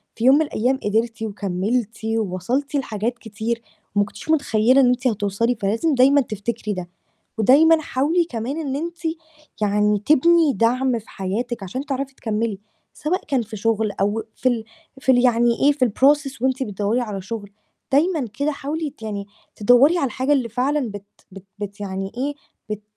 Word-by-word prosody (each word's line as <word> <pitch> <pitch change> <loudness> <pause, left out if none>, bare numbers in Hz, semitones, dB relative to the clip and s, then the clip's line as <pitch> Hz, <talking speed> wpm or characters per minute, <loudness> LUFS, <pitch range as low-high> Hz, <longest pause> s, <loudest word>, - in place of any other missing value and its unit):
في 230 - -2
يوم 265 +2 +8
من 310 - +4
الأيام 260 +2 0
قدرتِ 225 +2 0
وكمّلتِ 210 +2 -2
ووصلتِ 225 - -1
لحاجات 235 -2 -2
كتير 225 +1 -4 0.3
ما 205 - +4
كنتيش 205 +8 -10
متخيلة 260 -4 +4
إن 250 - +5
أنتِ 250 +1 +1
هتوصلي، 215 +2 0
فلازم 230 +10 +1
دايمًا 275 +3 +5
تفتكري 215 -1 -4
ده، 180 -2 -6 0.5
ودايمًا 315 +8 +5
حاولي 305 +6 +1
كمان 250 +2 -4
إن 275 -4 -3
أنتِ 340 +3 -4 0.6
يعني 210 0 +2
تبني 315 +1 +5
دعم 240 +3 +1
في 220 - -19
حياتِك 215 +4 -3
عشان 255 +10 -5
تعرفي 275 0 -3
تكمّلي، 220 -3 -2 0.3
سواء 335 +5 -2
كان 270 -4 +1
في 220 -1 -7
شغل 220 0 0
أو 205 +3 -1
في 255 - +1
ال 230 -3 -1 0.4
في 265 - +3
ال 245 - +5
يعني 240 0 +4
إيه 285 +1 +6
في 275 -3 +1
الprocess 275 +3 +2
وأنتِ 260 0 +1
بتدوّري 210 +3 -1
على 205 -5 -4
شغل، 205 0 -6 0.4
دايمًا 300 -2 +2
كده 300 +2 +1
حاولي 295 +2 -3
ت 270 - -24
يعني 200 -2 -4 0.3
تدوّري 245 +10 +5
على 280 - +1
الحاجة 260 +5 0
اللي 250 -5 0
فعلًا 255 0 0
بت 205 0 -8 0.3
بت 195 0 -11 0.2
بت 205 0 -6
يعني 195 0 -4
إيه، 285 +3 -1 0.4
بت 210 0 -4
235 Hz, 170 wpm, -22 LUFS, 210-275 Hz, 0.6 s, يوم